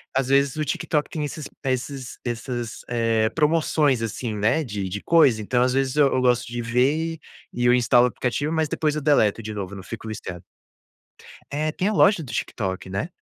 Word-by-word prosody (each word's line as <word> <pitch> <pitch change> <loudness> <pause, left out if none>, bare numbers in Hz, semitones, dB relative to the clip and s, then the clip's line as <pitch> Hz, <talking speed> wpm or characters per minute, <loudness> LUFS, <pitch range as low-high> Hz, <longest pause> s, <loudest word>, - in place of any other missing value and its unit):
às 135 -1 +1
vezes 140 0 +3
o 155 - -1
TikTok 150 0 -1
tem 150 -2 -3
esses 145 0 -6 0.2
esses 130 0 -3
essas, 120 -1 -4
eh, 115 -2 +1
promoções, 150 -4 +2
assim, 115 0 -3
né, 110 +10 +2
de 100 -6 -4
de 100 +3 -5
coisa, 135 -10 +4
então, 125 +4 +1
às 125 0 +1
vezes, 135 0 0
eu 145 -2 +6
eu 130 - +1
gosto 125 -1 +2
de 120 0 -4
ver, 140 +8 +1
e - - -35 0.3
e 120 0 -2
eu 120 - +6
instalo 125 0 +4
o - - +3
aplicativo, 130 +6 -2
mas 160 -2 0
depois 150 -1 0
eu 150 - -2
deleto 115 -7 +3
de 110 0 -5
novo, 100 -1 -5
não 95 - -9
fico 110 +2 -8
listando. 95 -4 -7 1.1
É, 155 +2 -1
tem 185 +5 -1
a 215 - +1
loja 200 -3 +4
do 125 - -8
TikTok, 95 -3 -3
né. 95 - -3
125 Hz, 205 wpm, -23 LUFS, 115-150 Hz, 1.1 s, eu